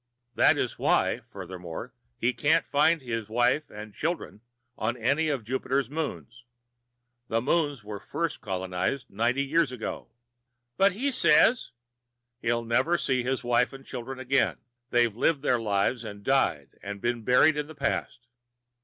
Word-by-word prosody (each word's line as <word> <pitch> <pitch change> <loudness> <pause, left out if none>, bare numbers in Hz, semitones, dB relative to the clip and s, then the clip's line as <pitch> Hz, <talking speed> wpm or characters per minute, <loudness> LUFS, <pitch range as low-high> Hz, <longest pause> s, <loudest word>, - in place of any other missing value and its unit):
That - - +4
is - - -2
why, - - +2
furthermore, 90 -3 -8 0.2
he 120 +2 +1
can't 145 +6 +2
find 150 +1 +2
his 115 -3 -4
wife 120 +6 +1
and 105 0 -9
children 160 - -3 0.3
on 120 +3 -2
any 140 +7 +1
of 135 -6 -2
Jupiter's 130 +2 -1
moons. 140 -6 -5 0.8
The 115 - +1
moons 145 -1 0
were 105 -1 -6
first 165 +8 -3
colonized 95 +6 -3
ninety 120 +6 +1
years 150 0 +1
ago." 125 -3 -6 0.7
"But 195 0 +4
he 270 +8 -1
says 245 -1 +4 0.4
" 120 0 -56
"He'll 115 0 0
never 125 +9 +2
see 130 -5 0
his 130 +1 -2
wife 120 +2 +2
and 135 0 -11
children 130 +1 -6
again. 130 +1 +1 0.3
They've 120 -4 +2
lived 145 +4 +1
their 125 -4 +2
lives 110 +2 0
and 105 -2 -8
died 80 - 0
and 100 0 -6
been 120 +2 -1
buried 125 +7 +4
in 150 0 -3
the 155 - -11
past. 140 -3 -2
125 Hz, 155 wpm, -27 LUFS, 115-140 Hz, 0.8 s, That